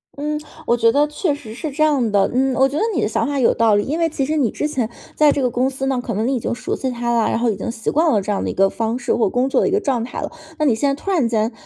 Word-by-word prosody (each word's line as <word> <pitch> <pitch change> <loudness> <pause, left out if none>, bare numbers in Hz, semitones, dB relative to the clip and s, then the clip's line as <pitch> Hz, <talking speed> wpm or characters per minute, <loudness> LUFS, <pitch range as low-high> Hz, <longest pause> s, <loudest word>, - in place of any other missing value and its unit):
嗯， 300 +1 -3 0.3
我 235 - +3
觉 230 -1 +3
得 290 +4 +3
确 300 0 -1
实 230 -7 -10
是 305 +7 -5
这 305 +3 0
样 275 -8 +2
的。 200 -1 +3
嗯， 260 +1 +1
我 265 +1 +4
觉 270 - -6
得 - - +1
你 - - +1
的 - - +2
想 - - -1
法 285 -1 -1
有 245 - +4
道 225 -2 +3
理， 205 - +2
因 310 +5 -2
为 330 -1 +2
其 280 -3 -2
实 305 +3 -1
你 275 -7 +2
之 300 - -2
前 255 -7 -2 0.3
在 300 -1 +5
这 285 - -1
个 250 - +2
公 250 +3 +1
司 270 0 -4
呢， 265 -2 0
可 235 - -3
能 220 +3 0
你 270 - +1
已 - - -1
经 235 - -2
熟 - - -3
悉 265 - -2
它 240 -1 -2
了， 230 -1 +2
然 - - 0
后 235 0 +1
已 - - -3
经 195 +5 -5
习 225 -2 -3
惯 315 +2 +3
了 215 - +3
这 200 - -3
样 200 - -1
的 - - -2
一 - - -3
个 195 +1 +3
方 225 +3 -2
式， 245 -1 -1
或 230 - +2
者 - - +1
工 250 +5 +1
作 270 - +2
的 - - +2
一 - - 0
个 405 - +2
状 260 - -1
态 245 - -6
了。 - - -4 0.3
那 305 - 0
你 265 - +4
现 280 +6 +1
在 275 +1 -2
突 395 - -3
然 320 -11 +2
间 220 0 0
255 Hz, 380 characters per minute, -20 LUFS, 230-290 Hz, 0.3 s, 在